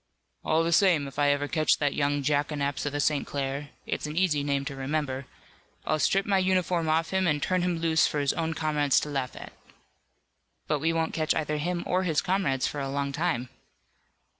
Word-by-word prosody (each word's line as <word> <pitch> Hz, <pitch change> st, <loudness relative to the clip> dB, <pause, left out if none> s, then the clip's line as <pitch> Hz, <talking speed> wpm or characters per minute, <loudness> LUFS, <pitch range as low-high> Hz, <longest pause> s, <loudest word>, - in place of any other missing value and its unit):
"All 160 Hz, +1 st, +2 dB
the 165 Hz, -, 0 dB
same, 170 Hz, -5 st, +4 dB
if 135 Hz, +1 st, -8 dB
I 145 Hz, 0 st, +4 dB
ever 145 Hz, 0 st, +1 dB
catch 155 Hz, 0 st, +2 dB
that 145 Hz, -2 st, 0 dB
young 145 Hz, 0 st, 0 dB
jackanapes 145 Hz, 0 st, 0 dB
of 145 Hz, -, -3 dB
a -, -, -1 dB
St. 145 Hz, -1 st, +1 dB
Clair 140 Hz, +1 st, -3 dB, 0.2 s
it's -, -, -3 dB
an 150 Hz, +2 st, -6 dB
easy 170 Hz, -6 st, +2 dB
name 140 Hz, -1 st, -1 dB
to 140 Hz, -1 st, -5 dB
remember 135 Hz, -1 st, -3 dB, 0.6 s
I'll 155 Hz, -, 0 dB
strip 195 Hz, +5 st, +2 dB
my 195 Hz, -2 st, +2 dB
uniform 185 Hz, -3 st, +1 dB
off 160 Hz, +1 st, +1 dB
him 190 Hz, -1 st, +1 dB
and 150 Hz, -2 st, +2 dB
turn 185 Hz, +5 st, 0 dB
him 175 Hz, -1 st, 0 dB
loose 165 Hz, -1 st, +3 dB
for 150 Hz, -, -2 dB
his 140 Hz, -1 st, +1 dB
own 165 Hz, -1 st, -2 dB
comrades 150 Hz, -3 st, +2 dB
to 150 Hz, -, -4 dB
laugh 135 Hz, -3 st, -3 dB
at." -, -, -10 dB, 1.1 s
"But 150 Hz, -, 0 dB
we 160 Hz, +3 st, +1 dB
won't 165 Hz, -1 st, -1 dB
catch 155 Hz, -1 st, 0 dB
either 150 Hz, -1 st, -1 dB
him 175 Hz, +3 st, -2 dB
or 185 Hz, +1 st, +1 dB
his 165 Hz, -5 st, +1 dB
comrades 180 Hz, -9 st, 0 dB
for 145 Hz, -, -3 dB
a 135 Hz, -1 st, -3 dB
long 140 Hz, 0 st, -2 dB
time." 130 Hz, -5 st, -1 dB
150 Hz, 210 wpm, -27 LUFS, 140-165 Hz, 1.1 s, same